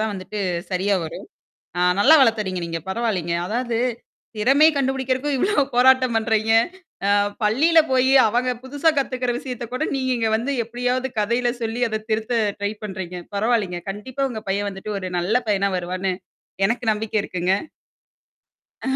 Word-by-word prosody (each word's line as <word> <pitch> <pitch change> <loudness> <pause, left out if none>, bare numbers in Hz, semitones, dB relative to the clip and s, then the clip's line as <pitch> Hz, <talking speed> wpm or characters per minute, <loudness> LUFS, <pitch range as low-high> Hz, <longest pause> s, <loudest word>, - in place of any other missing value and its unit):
தான் 220 0 0
வந்துட்டு 195 +2 -6 0.3
சரியா 190 +2 +1
வரும். 160 - -8 0.5
ஆ - - +1 0.2
நல்லா 305 +9 +7
வளர்த்துறீங்க 210 -7 +1
நீங்க. 165 0 -4
பரவாயில்லங்க. 190 -6 -1
அதாவது 235 +2 -1 0.6
திறமைய 275 +8 +5
கண்டுபிடிக்கிறதுக்கும் 265 0 0
இவ்வளோ 375 -2 +2
போராட்டம் 255 -1 +4
பண்றீங்க. 220 0 +1 0.6
அ - - +3 0.3
பள்ளியில 305 +10 +4
போயி 260 0 +3 0.2
அவங்க 245 +3 +1
புதுசா 290 +5 +1
கத்துக்கிற 255 -2 0
விஷயத்த 250 -4 -6
கூட 255 - -1
நீங்க 260 -1 -1
இங்க 225 -1 0
வந்து 255 +5 -2
எப்படியாவது 250 +3 -2
கதையில 235 +4 +1
சொல்லி 225 +1 -2
அத 220 0 -3
திருத்த 220 +2 0 0.2
ட்ரை 205 0 -1
பண்றீங்க. 190 -3 -6 0.2
பரவாயில்லங்க. 205 -5 0
கண்டிப்பா 260 +7 -3
உங்க 220 - -6
பையன் 200 +1 0
வந்துட்டு 200 +2 -6
ஒரு 185 -1 -5
நல்ல 180 +6 -1 0.2
பையனா 200 -1 +2
வருவார்ன்னு 185 +1 -2 0.5
எனக்கு 235 +3 -1
நம்பிக்கை 215 0 -3
இருக்குங்க. 180 +1 -1 1.3
அஹ 265 0 0
225 Hz, 145 wpm, -22 LUFS, 200-255 Hz, 1.3 s, நல்லா